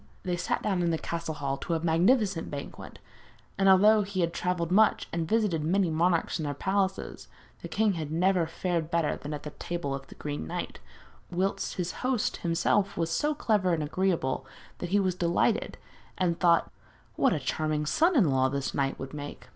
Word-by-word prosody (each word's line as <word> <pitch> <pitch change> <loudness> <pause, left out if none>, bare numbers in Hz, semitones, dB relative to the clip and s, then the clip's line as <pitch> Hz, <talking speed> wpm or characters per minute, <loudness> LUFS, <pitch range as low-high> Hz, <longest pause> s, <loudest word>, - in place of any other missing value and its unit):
They 180 -1 -1
sat 175 - -2
down 190 -4 0
in 170 - +1
the 165 - +1
castle 165 -1 -4
hall 140 -1 -2
to 170 - -2
a - - 0
magnificent 180 +3 +2
banquet, 140 -1 -8 0.6
and 195 0 +3
although 210 +3 +6
he 195 -2 -2
had 170 0 0
travelled 175 -2 -1
much 215 +3 +4
and 165 -1 -1
visited 210 -8 +1
many 180 +2 +2
monarchs 170 +1 +1
in 155 - -2
their 145 -1 -3
palaces, 190 +4 -2 0.3
the - - -6
king 215 -2 +1
had 155 -4 -4
never 180 +1 +2
fared 165 -1 -2
better 165 -3 +1
than 145 - -7
at 150 -1 -5
the 150 - -6
table 170 -4 -4
of 135 0 -6
the - - -13
Green 145 - -5
Knight, - - -5 0.5
whilst 185 +3 -1
his 180 -1 -2
host 255 -3 0
himself 190 +4 +1
was 165 0 -1
so 295 - +1
clever 205 -10 +1
and 155 - -2
agreeable, 155 -5 0 0.4
that 175 - -4
he 200 +3 +3
was 185 -2 +1
delighted, 175 -1 0 0.4
and 175 -2 0
thought 170 -2 +3 0.4
'what - - +3
a 160 - 0
charming 150 +3 -1
son 330 - +2
in 190 - +4
law 130 0 +3
this 140 0 -3
knight 135 -1 0
would 135 +1 -7
make!' 145 -1 -8
170 Hz, 195 wpm, -28 LUFS, 155-190 Hz, 0.6 s, although